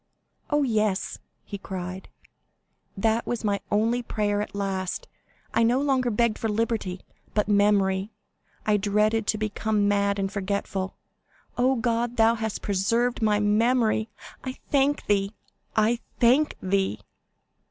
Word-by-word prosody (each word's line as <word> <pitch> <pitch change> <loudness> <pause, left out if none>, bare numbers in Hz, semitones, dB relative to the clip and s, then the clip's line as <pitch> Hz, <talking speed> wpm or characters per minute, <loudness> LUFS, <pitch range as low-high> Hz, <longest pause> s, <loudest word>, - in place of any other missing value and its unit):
_'" - - -47 0.5
"Oh, 295 -1 +2
yes," 215 -6 0 0.2
he 200 - -7
cried, 185 -1 -6 0.9
"that 225 +3 +1
was 240 -2 -2
my 200 -2 +1
only 225 +4 +2
prayer 205 -3 -1
at 210 - -6
last; 195 - -2 0.5
I 230 - +3
no 235 +3 +3
longer 265 -3 +1
begged 235 0 +1
for 225 - -1
liberty, 210 -4 -1 0.3
but 210 -1 +2
memory; 200 -1 +2 0.5
I 210 -1 +3
dreaded 210 +2 +1
to 215 - +2
become 215 -1 0
mad 200 0 +2
and 195 -1 -1
forgetful. 195 -1 -3 0.6
Oh, 255 +2 +3
God, 235 0 -1
thou 225 0 +5
hast 220 -2 -4
preserved 230 +6 +1
my 210 -1 +3
memory; 220 +1 +2 0.3
I 260 0 -4 0.2
thank 285 +1 +2
thee, 200 +1 +1 0.4
I 225 +2 +3 0.2
thank 260 +6 +4
thee!" 190 - 0
215 Hz, 135 wpm, -26 LUFS, 200-235 Hz, 0.9 s, thou